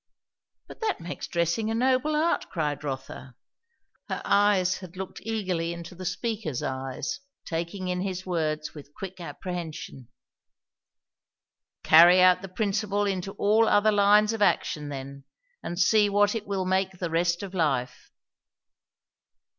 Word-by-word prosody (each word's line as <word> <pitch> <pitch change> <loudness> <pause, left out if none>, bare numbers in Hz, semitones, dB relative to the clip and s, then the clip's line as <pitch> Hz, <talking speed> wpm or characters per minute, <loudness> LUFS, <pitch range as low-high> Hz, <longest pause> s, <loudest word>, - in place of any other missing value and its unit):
"But - - -13
that 430 -4 -1
makes 175 +2 -6
dressing 170 +6 0
a 225 - -1
noble 260 +5 +2
art!" 320 +3 0
cried 150 -4 -2
Rotha. 135 -2 -6 0.7
Her - - -3
eyes 200 -3 +3
had 185 -1 -11
looked 190 -1 -6
eagerly 185 -7 -2
into 170 0 -9
the 185 +1 -9
speaker's 200 - -3
eyes, 130 - -4 0.3
taking 170 +3 -4
in 180 0 -1
his 190 -1 -4
words 155 -4 -2
with 145 -1 -13
quick 190 -1 -8
apprehension. 170 -8 -7 1.8
"Carry 170 +3 +8
out 185 0 +5
the 195 - -8
principle 205 +1 -1
into 195 -1 -2
all 220 +2 +3
other 215 +1 +4
lines 210 +1 +4
of 225 - -4
action, 150 -6 +1
then; 140 0 -7 0.4
and 175 - -5
see 205 +3 +4
what 205 0 +3
it 220 -3 -5
will 195 -2 -1
make 190 0 0
the 175 -2 -4
rest 170 +2 +1
of 195 -1 -7
life." 140 -8 -1
185 Hz, 140 wpm, -26 LUFS, 165-205 Hz, 1.8 s, Carry